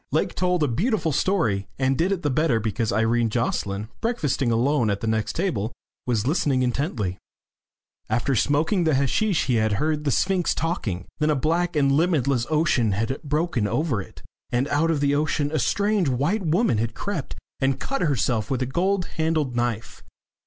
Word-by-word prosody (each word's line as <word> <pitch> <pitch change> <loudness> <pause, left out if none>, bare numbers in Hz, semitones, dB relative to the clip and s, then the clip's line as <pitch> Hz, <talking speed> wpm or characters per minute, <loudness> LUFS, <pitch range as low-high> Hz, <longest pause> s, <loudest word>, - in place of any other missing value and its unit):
Lake - - 0
told 180 -2 +1
a - - +3
beautiful 175 - 0
story, 115 - 0
and 135 0 +1
did 175 +7 +1
it 185 -3 -2
the 145 - +1
better 145 -4 +2
because 110 +1 -1
Irene 115 +2 +2
Jocelyn, 105 -3 -2
breakfasting 145 - 0
alone 120 +1 +2
at 100 -1 -1
the - - -3
next 110 -1 0
table, 125 - -1 0.4
was 115 -3 0
listening 140 -3 +1
intently. 125 - -2 0.9
After 120 +5 +1
smoking 155 - +2
the 160 -3 +2
hasheesh 160 - +1
he 125 -3 +1
had 110 -1 +1
heard 150 +6 0
the 145 - 0
Sphinx 185 +5 +1
talking. 105 - -2
Then 155 0 +2
a 150 - +3
black 170 +5 0
and 140 -2 +3
limitless 140 -6 +2
ocean 150 -9 +2
had 115 +7 -2
broken 150 -6 0
over 120 - 0
it, - - -13 0.3
and 125 +3 +1
out 160 +3 +2
of 155 -3 +1
the 140 0 +2
ocean 145 0 0
a 155 - 0
strange 205 -5 +1
white 145 - 0
woman 175 - +2
had 115 +1 -2
crept 185 -9 -4 0.2
and 135 -1 +1
cut 275 - -3
herself 125 -8 0
with 130 -1 0
a - - 0
gold 180 +7 0
handled 160 -5 0
knife. 120 -2 -3
140 Hz, 180 wpm, -24 LUFS, 115-165 Hz, 0.9 s, a